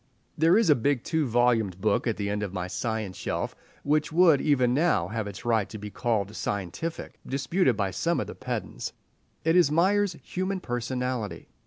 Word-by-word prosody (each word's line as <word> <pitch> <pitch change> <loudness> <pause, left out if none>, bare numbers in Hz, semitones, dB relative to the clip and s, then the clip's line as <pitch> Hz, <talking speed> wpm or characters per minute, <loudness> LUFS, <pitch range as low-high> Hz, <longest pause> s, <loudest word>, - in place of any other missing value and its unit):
There 165 +5 +4
is 220 -8 +4
a - - +7
big 130 +1 0
two 160 -3 0
volumed 115 -6 +2
book 105 +4 +1
at 115 - 0
the 100 - -2
end 105 +1 -1
of 100 -3 -3
my 90 -2 -3
science 110 0 -3
shelf - - -3 0.3
which 150 +2 +1
would, 165 -3 +5
even 130 -5 +3
now, 145 - +2
have 110 -1 -3
its 100 +4 -8
right 110 -4 +1
to 110 - -7
be 105 0 -7
called 110 -4 -1
scientific 100 - -4
disputed 135 - +1
by 100 -3 0
some 165 - 0
of - - -1
the - - -7
pedants. - - -5 0.5
It 165 +1 +3
is 175 -5 +6
Myers' 185 +3 +2
"Human 185 +1 -2
Personality." 125 - -3
125 Hz, 185 wpm, -27 LUFS, 105-160 Hz, 0.5 s, a